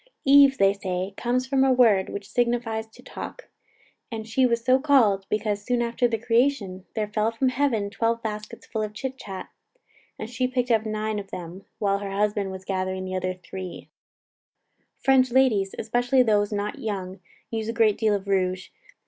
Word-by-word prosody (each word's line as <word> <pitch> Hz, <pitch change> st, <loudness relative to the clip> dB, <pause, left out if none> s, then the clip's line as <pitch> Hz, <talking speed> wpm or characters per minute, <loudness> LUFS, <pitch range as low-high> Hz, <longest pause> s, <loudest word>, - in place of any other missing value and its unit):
"Eve," 275 Hz, 0 st, +7 dB
say 195 Hz, -4 st, +3 dB
they, 185 Hz, +1 st, -3 dB
"comes 245 Hz, +3 st, 0 dB
from 265 Hz, 0 st, +2 dB
a 270 Hz, -, +4 dB
word, 225 Hz, -7 st, +4 dB
which 200 Hz, -1 st, -6 dB
signifies 235 Hz, -2 st, -1 dB
to 220 Hz, -, -18 dB
talk; -, -, -8 dB, 0.6 s
and 220 Hz, -1 st, -5 dB
she 255 Hz, +3 st, +3 dB
was 235 Hz, 0 st, -1 dB
so 260 Hz, 0 st, +5 dB
called, 230 Hz, -9 st, +3 dB
because, 210 Hz, -1 st, -1 dB
soon 245 Hz, +2 st, 0 dB
after 240 Hz, +1 st, +1 dB
the 230 Hz, -1 st, -1 dB
creation, 230 Hz, -5 st, 0 dB
there 215 Hz, -2 st, -1 dB
fell 215 Hz, +1 st, 0 dB
from 230 Hz, +3 st, 0 dB
heaven 255 Hz, -6 st, 0 dB
twelve 230 Hz, +1 st, -1 dB
baskets 215 Hz, -1 st, -6 dB
full 220 Hz, -, -3 dB
of 210 Hz, 0 st, -4 dB
chit 265 Hz, +3 st, -4 dB
chat, 195 Hz, -7 st, -8 dB, 0.7 s
and 215 Hz, -, -5 dB
she 250 Hz, +2 st, -1 dB
picked 250 Hz, -1 st, -1 dB
up 220 Hz, -1 st, +2 dB
nine 215 Hz, 0 st, -2 dB
of 195 Hz, -1 st, -9 dB
them, 180 Hz, +2 st, -8 dB
while 200 Hz, -1 st, +1 dB
her 200 Hz, -1 st, -5 dB
husband 205 Hz, 0 st, 0 dB
was 190 Hz, 0 st, -8 dB
gathering 185 Hz, -1 st, -2 dB
the 185 Hz, 0 st, -4 dB
other 185 Hz, 0 st, -2 dB
three." 185 Hz, 0 st, -8 dB, 1.1 s
French 260 Hz, -1 st, +4 dB
ladies, 230 Hz, -7 st, +3 dB
especially 245 Hz, +3 st, +2 dB
those 210 Hz, -3 st, +2 dB
not 205 Hz, 0 st, -3 dB
young, 190 Hz, -3 st, -4 dB, 0.3 s
use 225 Hz, -1 st, -3 dB
a -, -, +1 dB
great 225 Hz, -3 st, +3 dB
deal 215 Hz, -2 st, +3 dB
of 200 Hz, -1 st, -4 dB
rouge. 185 Hz, -1 st, 0 dB
220 Hz, 180 wpm, -25 LUFS, 195-245 Hz, 1.1 s, Eve